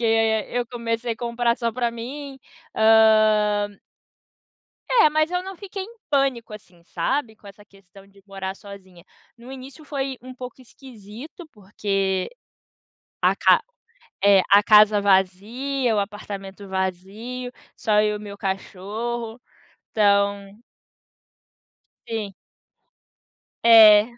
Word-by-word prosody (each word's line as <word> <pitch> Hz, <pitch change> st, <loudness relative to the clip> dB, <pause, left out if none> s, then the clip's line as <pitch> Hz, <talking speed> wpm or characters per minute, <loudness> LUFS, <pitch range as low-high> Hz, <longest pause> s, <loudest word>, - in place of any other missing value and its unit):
Porque 235 Hz, -, -2 dB, 0.5 s
eu 245 Hz, 0 st, -2 dB
comecei 230 Hz, 0 st, -3 dB
a -, -, -9 dB
comprar 235 Hz, 0 st, -1 dB
só 235 Hz, -1 st, -1 dB
pra 240 Hz, 0 st, -1 dB
mim. 270 Hz, +4 st, -8 dB, 0.4 s
Hã 215 Hz, -2 st, +4 dB, 1.1 s
É, 455 Hz, -11 st, +5 dB
mas 310 Hz, +1 st, +1 dB
eu 360 Hz, 0 st, -1 dB
não 385 Hz, +1 st, -8 dB
fiquei 395 Hz, 0 st, -7 dB
em 460 Hz, +4 st, -12 dB
pânico, 270 Hz, -6 st, 0 dB
assim, 180 Hz, -5 st, -15 dB
sabe? 220 Hz, +7 st, -2 dB
Com 205 Hz, -, -19 dB
essa 205 Hz, +1 st, -14 dB
questão 195 Hz, -1 st, -19 dB
de 195 Hz, 0 st, -22 dB
morar 195 Hz, -1 st, -6 dB
sozinha. 190 Hz, -4 st, -14 dB, 0.3 s
No 245 Hz, +2 st, -12 dB
início 270 Hz, +4 st, -11 dB
foi 270 Hz, -2 st, -4 dB
um 255 Hz, 0 st, -10 dB
pouco 250 Hz, 0 st, -10 dB
esquisito, 250 Hz, -, -12 dB
porque 195 Hz, -2 st, -2 dB, 0.9 s
a -, -, +3 dB
ca -, -, +4 dB, 0.6 s
eh, 200 Hz, -1 st, +6 dB
a 200 Hz, -, +8 dB
casa 210 Hz, 0 st, +6 dB
vazia, 215 Hz, +7 st, 0 dB
o -, -, +2 dB
apartamento 200 Hz, -1 st, -7 dB
vazio, 195 Hz, +7 st, -5 dB, 0.2 s
só 210 Hz, -3 st, +2 dB
eu 210 Hz, 0 st, 0 dB
e -, -, -13 dB
meu 205 Hz, -1 st, -9 dB
cachorro. 220 Hz, +4 st, -5 dB, 0.5 s
Então 200 Hz, -1 st, +1 dB, 1.5 s
Sim. 215 Hz, -3 st, -4 dB, 1.3 s
É, 215 Hz, -2 st, +8 dB
215 Hz, 120 wpm, -23 LUFS, 200-245 Hz, 1.5 s, a